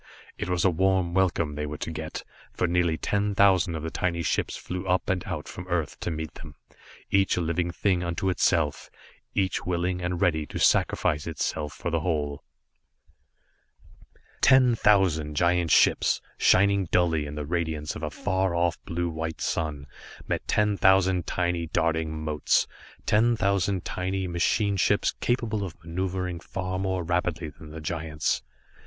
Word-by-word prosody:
It - - -4
was 90 0 +1
a 95 - +5
warm 95 0 +1
welcome 85 -5 +1
they 75 0 -3
were 75 +1 -5
to 80 - -4
get, 80 0 -6 0.3
for - - -1
nearly 85 -1 +1
ten 100 +2 -1
thousand 95 -4 +4
of 80 - -5
the 80 - -4
tiny 85 -2 -1
ships - - -1
flew 90 +1 -5
up 90 +1 +1
and 90 -2 -1
out 85 -5 -5
from 90 0 -8
Earth 85 -4 -2
to - - -3
meet 80 -1 -4
them, 75 -2 -11 0.6
each 95 -1 +3
a - - +2
living 85 +1 0
thing 90 0 0
unto 85 +2 -2
itself, 80 -5 +1 0.5
each 95 -2 0
willing 90 0 -1
and 90 0 -2
ready 80 -4 +1
to - - -6
sacrifice 75 +1 +2
itself 75 -2 -3
for 85 +6 -4
the 85 - +1
whole. 75 -4 -2 2.0
Ten 130 -2 +6
thousand 95 -9 +2
giant 85 +1 +2
ships, - - +4 0.2
shining 100 0 +4
dully 80 -3 +1
in 75 - -7
the 75 -1 -4
radiance 80 -2 -2
of - - -7
a 75 - -2
far 95 +2 -1
off 85 -1 0
blue 85 +1 -2
white 80 0 -4
sun, 75 -4 -2 0.4
met - - -2
ten 105 -1 +2
thousand 95 -2 +3
tiny, 85 -2 -1
darting 80 -1 -1
motes, 75 -2 +2 0.4
ten 115 +3 +3
thousand 100 -3 0
tiny 95 +1 -2
machine 100 +4 +1
ships 100 +2 +2
capable 115 -4 0
of 85 -6 -6
maneuvering 90 0 -3
far 95 +1 -4
more 95 -2 -1
rapidly 85 -1 -1
than 80 0 -13
the 80 +1 -8
giants. 80 -2 -2
85 Hz, 160 wpm, -26 LUFS, 80-95 Hz, 2.0 s, Ten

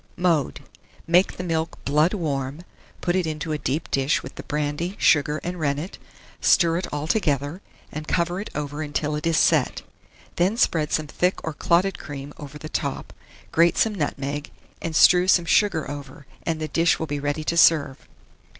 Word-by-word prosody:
Mode. 170 -6 +1 0.4
Make 175 +3 +3
the 180 - -4
milk 165 -2 -2
blood 150 +7 +2
warm; 140 -4 -3 0.4
put 175 0 0
it 185 -3 +1
into 155 0 -4
a 150 - -1
deep 150 +4 -2
dish 135 +2 +1
with 130 - -9
the - - -8
brandy, 150 +5 -3
sugar, 150 0 +3
and 175 0 -4
rennet; 150 +4 -2 0.4
stir 170 -2 +4
it 180 - -3
altogether, 150 - -1 0.3
and 155 0 -6
cover 175 +2 0
it 210 - -7
over 145 0 -4
until 150 0 -2
it 150 +2 -2
is 165 -1 +2
set. - - +2 0.5
Then 185 +6 +2
spread 155 -9 +1
some 155 - 0
thick 180 +5 -1
or 160 - -3
clotted 180 +4 +1
cream 145 -2 -8
over 145 0 -9
the 155 - -8
top, - - -4 0.4
grate 170 +1 +4
some 220 - +3
nutmeg, 145 -4 -3 0.3
and 165 -1 -4
strew 180 +3 +6
some 175 -2 +4
sugar 165 -4 +2
over, 145 0 -8 0.2
and 160 -1 0
the 155 - -3
dish 165 +3 +2
will 160 - -3
be 145 -1 -3
ready 145 +2 -2
to 170 - -1
serve. 155 -5 +3
155 Hz, 175 wpm, -24 LUFS, 145-175 Hz, 0.5 s, strew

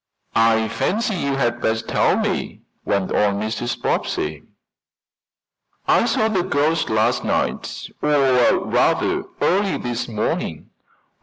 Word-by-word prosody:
"I 115 -1 +3
fancy 215 - -1
you 140 -7 -1
had 120 -3 0
best 110 0 -1
tell - - +2
me," - - -2 0.2
went 100 -2 0
on 100 -1 +2
Mrs. 110 +3 -3
Bobbsey. 75 0 -2 1.5
"I - - +4
saw 220 - +2
the 200 -5 +1
ghost 160 -2 0
last 110 +3 +1
night - - -2
or 135 -4 +3
rather, - - +1 0.2
early 195 +2 +2
this 120 -1 -3
morning." 110 -3 -3
120 Hz, 120 wpm, -21 LUFS, 110-150 Hz, 1.5 s, I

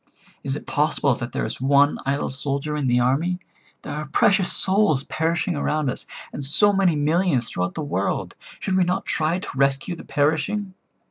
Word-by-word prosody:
Is 135 -1 -2
it - - -7
possible 145 -2 +1
that 120 +1 -5
there - - -2
is - - -6
one 140 +2 +4
idle 140 +1 0
soldier 140 +2 -2
in 145 -3 -1
the 125 0 +3
army? 145 +9 +1 0.5
There 145 - -5
are 150 +1 -4
precious 190 +5 +3
souls 190 -8 +2
perishing 165 +3 -1
around 150 -1 0
us, - - -6 0.3
and 145 - -5
so 205 +10 +4
many 190 -4 +3
millions 150 -4 +2
throughout 90 0 -2
the 160 - -3
world. 100 -9 -2 0.3
Should 190 -1 -1
we 185 - +4
not 180 +1 -1
try 160 +2 0
to 185 - -6
rescue 140 +5 +1
the - - -10
perishing? 160 +7 0
150 Hz, 185 wpm, -23 LUFS, 140-175 Hz, 0.5 s, one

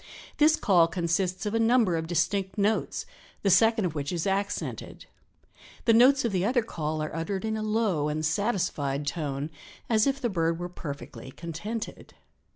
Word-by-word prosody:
This 310 +1 +5
call 175 - +4
consists 175 +3 -1
of 210 - -2
a 225 - +2
number 225 -5 +3
of 160 0 -2
distinct 185 +4 0
notes, 210 +2 0 0.4
the 195 - +3
second 225 +2 +4
of 170 - -2
which 145 -2 -3
is 170 -3 -2
accented. 200 +1 -3 0.8
The 230 - +5
notes 255 +3 +5
of 230 - +1
the 185 -2 0
other 240 +3 +2
call 155 -6 -3
are 155 - -5
uttered 190 +5 -3
in 220 0 -1
a 215 - -3
low 215 -8 0
and 155 +1 -2
satisfied 160 - -1
tone 145 -1 -3 0.4
as 220 +3 +4
if 275 0 0
the 250 - 0
bird 165 -5 0
were 175 +1 -5
perfectly 140 -7 -8
contented. 170 - -6
185 Hz, 170 wpm, -27 LUFS, 160-220 Hz, 0.8 s, This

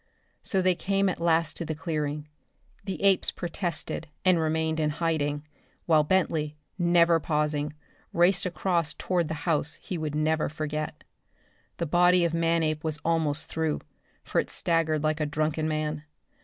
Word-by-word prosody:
So 190 -2 0
they 185 0 +4
came 195 +2 +1
at 185 - -3
last 165 -1 +2
to - - -1
the 160 -1 -3
clearing. 150 -2 -3 0.6
The 195 -1 -4
apes 195 -1 +4
protested 175 -2 -3 0.2
and 185 -2 +5
remained 160 0 0
in 155 -1 +2
hiding, 150 -2 -1 0.4
while 155 -3 +4
Bentley, 155 -3 0 0.2
never 170 -1 +4
pausing, 150 -1 -1 0.4
raced 180 +2 +3
across 170 -3 0
toward 175 -3 0
the 160 0 -5
house 160 -2 +2
he 180 - -6
would 155 -2 -3
never 155 +1 +1
forget. 155 0 -4 0.7
The 170 - -1
body 175 +2 +4
of 165 - -1
Manape 165 -2 +1
was 155 -2 -1
almost 160 -3 +1
through, 160 -2 -1 0.4
for - - +1
it - - -10
staggered 160 -2 +1
like 155 0 +1
a 150 - 0
drunken 155 +1 -1
man. 155 -1 -2
160 Hz, 155 wpm, -27 LUFS, 150-170 Hz, 0.7 s, and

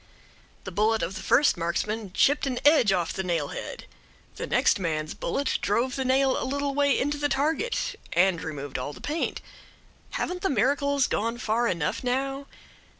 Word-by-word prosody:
The - - -6
bullet 215 +4 +1
of 170 +3 -2
the - - -6
first 285 -8 +4
marksman 195 +5 -2
chipped 285 +5 +3
an 255 -2 -2
edge 290 -9 +6
off 175 -3 0
the - - -2
nail 170 -6 -1
head; - - -7 0.5
the - - -5
next - - +3
man's 155 -4 -2
bullet 275 +10 -1
drove 240 +5 0
the 265 - -1
nail 265 +1 +2
a - - -1
little 280 +1 -1
way 285 -1 +2
into 290 +2 -1
the 290 0 +1
target 315 - 0 0.2
and 175 -1 +3
removed 145 -4 -5
all 145 +3 -4
the - - -12
paint. 310 +3 -2 0.8
Haven't 360 0 -3
the 385 - +1
miracles 280 +2 +2
gone 230 +2 -1
far 235 0 0
enough 170 0 -1
now? 270 +2 -1
245 Hz, 175 wpm, -26 LUFS, 180-280 Hz, 0.8 s, edge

